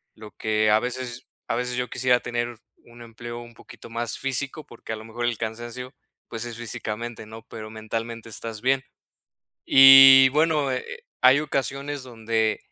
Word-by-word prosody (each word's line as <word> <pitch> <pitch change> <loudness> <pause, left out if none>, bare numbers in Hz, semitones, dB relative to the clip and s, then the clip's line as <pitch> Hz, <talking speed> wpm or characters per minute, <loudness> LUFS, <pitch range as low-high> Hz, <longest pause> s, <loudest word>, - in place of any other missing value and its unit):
Lo 105 -1 -12
que 110 0 0
a 110 - +5
veces 125 0 -6 0.2
a - - -1
veces 125 +1 -3
yo 125 0 -3
quisiera 125 -1 +2
tener 120 0 -4 0.2
un 120 0 -16
empleo 120 +1 -9
un 120 0 -12
poquito 115 - -15
más 115 -1 -4
físico, 135 +3 -3
porque 115 -1 -9
a - - -3
lo 110 0 -11
mejor 120 +2 -5
el 120 -2 -1
cansancio, 120 +3 -6 0.3
pues 115 -1 -6
es 120 -1 -7
físicamente, 115 0 -6
¿no?, 110 +1 -11
pero 110 -1 -9
mentalmente 115 +1 -6
estás 110 0 -5
bien. 130 +1 +1 0.8
Y 135 0 +9
bueno, 150 -1 +1
eh 130 - -3
eh, 480 -1 -9 0.2
hay 130 +2 +6
ocasiones 140 -1 -3
donde 115 -3 -1
120 Hz, 170 wpm, -24 LUFS, 115-130 Hz, 0.8 s, Y